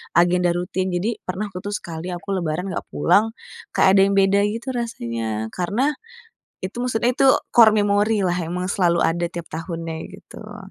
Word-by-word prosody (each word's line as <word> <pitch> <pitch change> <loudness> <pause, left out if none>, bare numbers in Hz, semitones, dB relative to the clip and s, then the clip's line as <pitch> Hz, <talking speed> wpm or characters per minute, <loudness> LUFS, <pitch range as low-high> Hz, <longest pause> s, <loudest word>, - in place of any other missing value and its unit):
agenda 175 0 +3
rutin. 185 +1 -2
Jadi 190 +6 -2
pernah 195 +3 -5
aku 180 - -6
tuh 205 - -2
sekali, 175 +1 -5
aku 185 +3 -7
lebaran 180 0 -2
enggak - - -5
pulang, 205 - +2 0.4
kayak 190 +1 +5
ada - - +7
yang 200 - 0
beda 195 +1 +4
gitu 230 +5 -4
rasanya, 115 - -3
karena 210 - 0 0.7
itu 200 +5 -7
maksudnya 245 -1 +1
itu 270 - +2 0.3
core 225 -3 +7
memori 205 0 +2
lah, 175 - +1
emang 180 +2 -3
selalu 175 -3 +2
ada 170 +1 0
tiap 170 -1 -7
tahunnya 165 0 -5 0.2
gitu. - - -11
185 Hz, 170 wpm, -22 LUFS, 170-210 Hz, 0.7 s, ada